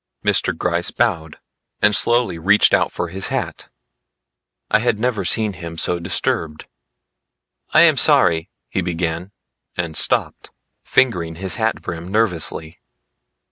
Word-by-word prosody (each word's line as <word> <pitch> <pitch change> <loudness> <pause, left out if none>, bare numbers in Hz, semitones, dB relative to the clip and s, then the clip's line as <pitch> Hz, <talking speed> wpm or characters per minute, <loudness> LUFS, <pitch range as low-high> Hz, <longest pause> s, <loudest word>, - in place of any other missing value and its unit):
Mr. - - +1
Gryce 85 0 -1
bowed, 85 -10 -2 0.4
and 105 -1 +3
slowly 120 -3 +1
reached 100 +5 +4
out - - +2
for 90 - -4
his 95 +2 -3
hat; - - -4 1.0
I 110 - +4
had 115 -1 0
never 110 -3 -1
seen 105 +4 +2
him 85 -2 -9
so 85 +1 0
disturbed. 80 -2 -2 1.0
"I - - +5
am - - +5
sorry," 85 +2 +3 0.2
he 95 - -2
began 85 +1 -3 0.5
and 85 -2 -3
stopped, - - 0 0.3
fingering 85 -10 +1
his 95 +1 -2
hat 110 0 -1
brim 85 0 -6
nervously. 90 -5 -2
90 Hz, 130 wpm, -19 LUFS, 85-105 Hz, 1.0 s, I